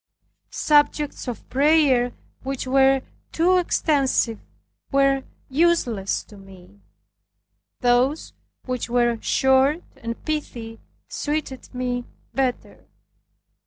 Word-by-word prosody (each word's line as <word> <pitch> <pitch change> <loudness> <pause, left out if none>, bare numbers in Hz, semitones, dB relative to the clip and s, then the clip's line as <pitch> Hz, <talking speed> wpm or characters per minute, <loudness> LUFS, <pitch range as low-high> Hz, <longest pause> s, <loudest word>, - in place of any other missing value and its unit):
Subjects 295 -1 +1
of 240 -4 -6
prayer 275 -3 +3 0.3
which 270 0 -4
were 270 0 +3 0.3
too 360 +3 +3
extensive 275 - +1 0.5
were 275 -1 +3 0.2
useless 265 - +1
to 210 - -16
me. 185 - -16 1.0
Those 250 +5 +2 0.3
which 250 -2 -3
were 240 -1 +2
short 265 +5 +3
and 230 0 -6
pithy 235 -7 -4 0.3
suited 295 -3 -4
me 245 -1 -2 0.3
better. 260 -2 -3
265 Hz, 90 wpm, -23 LUFS, 240-295 Hz, 1.0 s, prayer